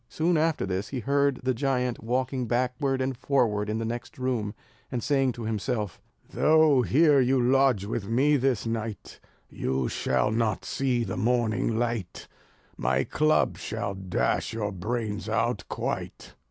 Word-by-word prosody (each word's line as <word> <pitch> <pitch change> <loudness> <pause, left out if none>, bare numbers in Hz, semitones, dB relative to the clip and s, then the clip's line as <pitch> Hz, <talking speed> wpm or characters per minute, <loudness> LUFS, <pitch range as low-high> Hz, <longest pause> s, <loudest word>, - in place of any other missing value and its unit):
Soon 170 +2 +1
after 160 -4 +1
this 95 +2 -2
he 130 -3 -4
heard 140 +1 +1
the 130 0 +1
giant 125 -2 -1
walking 125 +1 -1
backward 130 +3 0
and 130 0 -1
forward 115 -6 +1
in 110 - -1
the 115 - -2
next 120 +6 -5
room, 125 -5 -2 0.4
and 125 -3 -2
saying 135 -3 +2
to 120 - -7
himself: 110 -2 -2 0.3
"Though 155 -4 +4
here 145 +3 +4
you 130 +1 +2
lodge 125 -4 +3
with 100 -1 -4
me 140 +6 +3
this 130 -4 +1
night, 115 -2 -4 0.3
You 65 -1 -2
shall 65 +11 0
not 110 -3 0
see 125 -3 0
the 95 -4 -4
morning 115 -1 +1
light; 115 -6 -3 0.5
My 65 +2 +1
club 155 - +1
shall 100 -1 -3
dash 90 - -1
your 105 -2 -2
brains 105 +2 -3
out - - 0
quite." - - -4
120 Hz, 155 wpm, -27 LUFS, 105-135 Hz, 0.5 s, Though